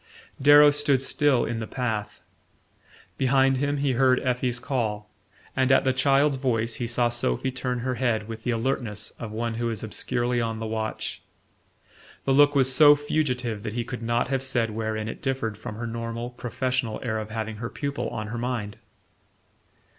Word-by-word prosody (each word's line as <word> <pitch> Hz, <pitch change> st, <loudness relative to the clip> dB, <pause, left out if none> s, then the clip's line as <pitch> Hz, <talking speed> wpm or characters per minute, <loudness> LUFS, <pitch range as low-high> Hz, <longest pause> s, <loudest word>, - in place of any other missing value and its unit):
Darrow 145 Hz, +1 st, +8 dB
stood 145 Hz, -2 st, +2 dB
still 135 Hz, -1 st, +2 dB
in 115 Hz, 0 st, -3 dB
the 110 Hz, -, -4 dB
path. 115 Hz, -5 st, -3 dB, 1.0 s
Behind 135 Hz, 0 st, +3 dB
him 145 Hz, +2 st, 0 dB
he 140 Hz, -1 st, +1 dB
heard 130 Hz, 0 st, +3 dB
Effie's 125 Hz, -1 st, 0 dB
call, 110 Hz, -5 st, -3 dB, 0.4 s
and 130 Hz, 0 st, +2 dB
at 130 Hz, -, +5 dB
the 130 Hz, -, +2 dB
child's 135 Hz, +2 st, +3 dB
voice 115 Hz, -3 st, 0 dB
he 120 Hz, -, -1 dB
saw 120 Hz, +1 st, +2 dB
Sophy 120 Hz, -, -1 dB
turn 125 Hz, -1 st, -3 dB
her 130 Hz, +1 st, -1 dB
head 115 Hz, -4 st, 0 dB
with 115 Hz, 0 st, -7 dB
the -, -, -2 dB
alertness 115 Hz, -3 st, -2 dB
of 115 Hz, -2 st, -6 dB
one 115 Hz, +1 st, -2 dB
who 120 Hz, -, 0 dB
is 110 Hz, -2 st, -3 dB
obscurely 120 Hz, +3 st, -1 dB
on 115 Hz, -1 st, -2 dB
the 110 Hz, -, -4 dB
watch. 110 Hz, 0 st, -4 dB, 1.0 s
The 135 Hz, -, +2 dB
look 145 Hz, +1 st, +5 dB
was 130 Hz, -1 st, +3 dB
so 145 Hz, +2 st, +8 dB
fugitive 130 Hz, -7 st, -1 dB
that 110 Hz, 0 st, -5 dB
he 120 Hz, 0 st, -1 dB
could 120 Hz, 0 st, -6 dB
not 120 Hz, +2 st, 0 dB
have 135 Hz, -1 st, 0 dB
said 120 Hz, -4 st, 0 dB
wherein 110 Hz, 0 st, -3 dB
it -, -, -7 dB
differed 130 Hz, -5 st, -2 dB
from 105 Hz, 0 st, -7 dB
her 120 Hz, +2 st, -5 dB
normal 115 Hz, +1 st, -4 dB
professional 125 Hz, -2 st, -2 dB
air 110 Hz, -3 st, -1 dB
of 110 Hz, 0 st, -6 dB
having 110 Hz, -1 st, -4 dB
her 115 Hz, +1 st, -5 dB
pupil 140 Hz, 0 st, -3 dB
on 110 Hz, -1 st, -5 dB
her 120 Hz, +1 st, -4 dB
mind. 120 Hz, -4 st, -3 dB
120 Hz, 180 wpm, -25 LUFS, 115-130 Hz, 1.0 s, Darrow